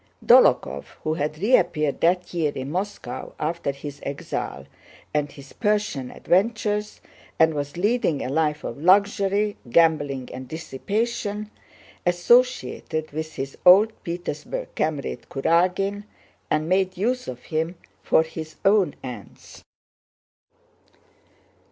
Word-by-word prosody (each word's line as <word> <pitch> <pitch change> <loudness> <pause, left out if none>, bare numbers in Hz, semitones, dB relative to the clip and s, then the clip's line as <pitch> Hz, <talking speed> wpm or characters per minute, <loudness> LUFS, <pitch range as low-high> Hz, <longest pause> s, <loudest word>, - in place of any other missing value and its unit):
Dólokhov, 70 +2 +5 0.2
who 155 - 0
had 150 0 -2
reappeared 175 - +2
that 180 +2 +2
year 160 -4 +1
in 135 +2 -4
Moscow 185 -8 -4
after 165 0 -2
his 140 +1 -8
exile 140 0 -5 0.5
and 145 -1 0
his 140 -1 -13
Persian 205 - 0
adventures, 210 +2 0 0.4
and 160 0 +4
was 145 +1 -4
leading 200 - +1
a - - -3
life 150 +1 0
of 140 - -6
luxury, 200 +3 +3
gambling, 145 -3 +2
and 130 0 -7
dissipation, 210 - -3 0.5
associated 175 -3 +2
with 155 +1 -5
his 135 +1 -5
old 200 +5 +7
Petersburg 170 -3 -4
comrade 155 -3 -2
Kurágin 185 +7 +1 0.4
and 155 +1 +1
made 185 +1 +1
use 250 +6 -1
of 125 -1 -7
him 160 +3 -2 0.3
for 160 - +4
his 160 -1 -8
own 195 -6 +4
ends. 120 -7 -10
165 Hz, 115 wpm, -24 LUFS, 145-200 Hz, 0.5 s, old